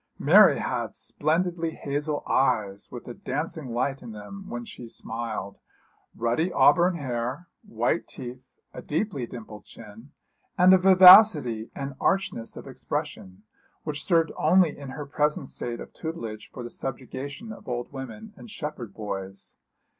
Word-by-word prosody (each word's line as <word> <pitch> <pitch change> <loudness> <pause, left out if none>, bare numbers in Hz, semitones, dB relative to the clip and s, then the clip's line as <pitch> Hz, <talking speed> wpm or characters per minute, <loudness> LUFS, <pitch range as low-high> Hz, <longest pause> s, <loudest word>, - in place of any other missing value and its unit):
Mary - - +7
had - - -3
splendid 170 +3 -1
hazel 150 -2 -2
eyes, 100 -6 0
with - - -9
a - - -6
dancing 150 -5 -4
light 130 +3 -1
in 115 -3 -9
them 190 - -9
when 120 0 -5
she 120 0 -10
smiled, 115 -3 -5 0.6
ruddy 120 +10 0
auburn 180 +1 +4
hair, 130 +2 -4
white 120 +8 -1
teeth, 125 0 -8 0.3
a - - -7
deeply 150 - -2
dimpled 110 -3 -10
chin, 115 +4 -13 0.5
and 180 +1 +7
a 190 - +6
vivacity 180 - +8
and 140 0 -5
archness 190 -12 -1
of - - -9
expression, 95 +2 -5 0.4
which 150 -2 -3
served 165 -3 +2
only 180 -5 +4
in 140 -2 -9
her 145 +2 -6
present 150 0 0
state 120 -1 -4
of - - -10
tutelage 115 -10 -6
for 125 - -8
the 120 - -7
subjugation 135 - -6
of - - -14
old 120 0 -4
women 205 +12 -8
and 230 - -12
shepherd 150 - -6
boys. 100 -2 -6
135 Hz, 145 wpm, -26 LUFS, 115-165 Hz, 0.6 s, vivacity